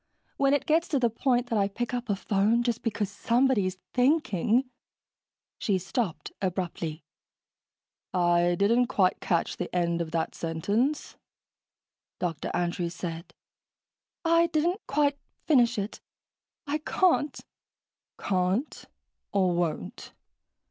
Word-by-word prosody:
When 275 0 +4
it 280 - -1
gets 325 +2 +2
to 285 - +1
the 240 -2 +2
point 245 +1 0
that 220 - +2
I 200 - +3
pick 235 +4 -4
up 245 -1 -3
a 200 - +2
phone 210 +4 +2
just 240 -1 -1
because 220 -3 -1
somebody's 225 -2 +1 0.2
thinking...." 250 - +2 0.9
She 200 -3 +1
stopped 185 - -3
abruptly. 175 -4 -3 1.1
"I 175 -1 +3
didn't 235 +6 +3
quite 185 -5 +2
catch 170 -2 0
the 180 - -3
end 170 -1 +1
of 165 - -3
that 165 0 -1
sentence," 205 - -1 1.0
Dr. 165 -4 -3
Andrews 175 0 -1
said. 170 -1 -6 0.9
"I 335 +1 +4
didn't 335 +5 0
quite 285 -1 +1 0.3
finish 245 -6 +4
it. 205 +1 -4 0.6
I 295 +1 -1
can't." 305 -2 +1 0.8
"Can't? 190 +8 -1 0.5
Or 190 -3 +2
won't? 165 - -3
205 Hz, 120 wpm, -28 LUFS, 175-260 Hz, 1.1 s, When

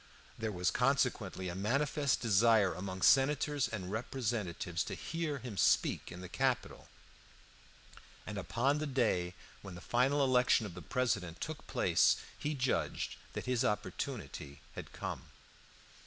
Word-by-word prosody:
There 110 -1 -3
was 90 -2 0
consequently 125 -7 +1
a 90 - -3
manifest 140 - +1
desire 110 -2 +4
among 95 +1 -5
senators 145 +1 +4
and 95 -5 -5
representatives 105 -7 -2
to - - -4
hear 160 -2 -3
him 125 -6 -7
speak - - +2
in 90 +1 -8
the 90 - -7
Capitol, 130 +5 -1 1.4
and 105 - -5
upon 130 +9 +1
the 155 - -2
day 105 -10 +1 0.3
when 95 -3 -9
the - - -8
final 130 +8 +2
election 125 -3 +4
of 100 - -7
the 90 - -8
President 95 - -1
took 155 -1 -6
place - - +3 0.2
he 150 +1 -3
judged 105 - -1 0.2
that - - -4
his 125 0 +1
opportunity 75 - -3
had - - -8
come. - - -5
115 Hz, 140 wpm, -34 LUFS, 95-135 Hz, 1.4 s, desire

